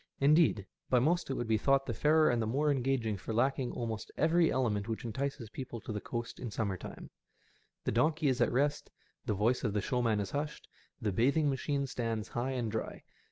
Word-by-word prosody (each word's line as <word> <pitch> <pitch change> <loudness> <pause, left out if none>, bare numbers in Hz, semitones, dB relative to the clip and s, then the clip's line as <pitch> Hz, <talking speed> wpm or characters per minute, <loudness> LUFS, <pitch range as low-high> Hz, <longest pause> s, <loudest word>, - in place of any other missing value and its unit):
Indeed, 145 - +4 0.2
by 130 - +4
most 160 +8 +2
it 135 - -1
would 120 - -2
be 110 -1 +2
thought 135 +3 +3
the - - -2
fairer 155 0 +4
and 120 -1 +1
the 110 - -1
more 145 +6 +2
engaging 125 -5 0
for 110 +3 -5
lacking 130 +1 +1
almost 110 -2 -4
every 165 +1 +3
element 105 -6 0
which 115 +1 -4
entices 120 0 -3
people 125 -3 -6
to 110 - -7
the 105 -1 -3
coast 120 0 -5
in 125 - -4
summer 105 -2 -2
time. - - -9 0.7
The - - 0
donkey 155 +6 +2
is 130 -2 +1
at - - +4
rest^ 145 +4 +1 0.4
the 105 - +1
voice 115 +6 +1
of 105 -5 0
the 105 - +1
showman 115 -2 +1
is 100 - -3
hushed, 150 +1 -4 0.3
the 110 -5 -1
bathing 140 - +2
machine 140 +1 -1
stands 115 -4 -3
high 125 +3 -2
and 120 -4 -2
dry. 110 - -4
125 Hz, 205 wpm, -32 LUFS, 110-140 Hz, 0.7 s, Indeed